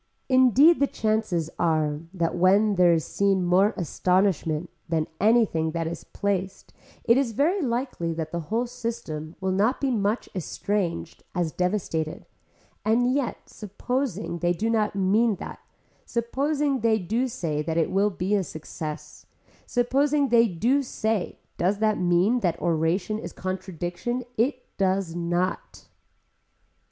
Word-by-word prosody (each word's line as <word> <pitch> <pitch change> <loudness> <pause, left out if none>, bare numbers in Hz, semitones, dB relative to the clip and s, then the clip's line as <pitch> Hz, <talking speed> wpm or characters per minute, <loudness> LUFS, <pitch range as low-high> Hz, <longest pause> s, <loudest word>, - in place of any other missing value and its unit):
Indeed 260 - +6
the 280 - +3
chances 215 - -1
are 155 -3 +1
that 170 -4 -1
when 195 +4 +4
there 180 -2 +5
is 165 -2 +1
seen 195 -2 +1
more 190 +4 +4
astonishment 180 -2 0 0.2
than 160 -2 +1
anything 205 -7 +3
that 165 -1 -1
is 165 0 -5
placed 195 -1 -3 0.3
it 235 +1 +4
is 260 -4 0
very 335 - +2
likely 240 - -2
that 160 -1 -4
the 170 - -2
whole 230 +3 +1
system 170 -10 -5
will 190 0 -1
be 185 - 0
not 230 +6 +3
so 275 -2 0
much 215 0 0
estranged 185 -1 -3
as 175 -3 0
devastated 175 -4 -2 0.6
and 245 +3 +2
yet 275 -3 -2
supposing 210 -3 -3
they 175 0 +2
do 220 +6 -1
not 215 -2 +1
mean 205 +3 +2
that, - - -8 0.4
supposing 275 +4 -1
they 225 -1 +3
do 225 +7 -1
say 165 -12 -2
that 160 +1 -2
it 165 - +1
will 200 +2 +3
be 190 +1 -2
a 200 -2 +2
success, 155 -2 -8 0.4
supposing 275 +3 +2
they 235 -1 +5
do 230 +10 +1
say 220 -6 -2 0.2
does 190 +4 +2
that 215 0 +1
mean 180 +7 +3
that 175 -6 -1
oration 175 +5 0
is - - -7
contradiction, 185 +5 -4
it 250 +3 0
does 190 -3 +1
not. 175 +2 -2
200 Hz, 145 wpm, -25 LUFS, 175-235 Hz, 0.6 s, Indeed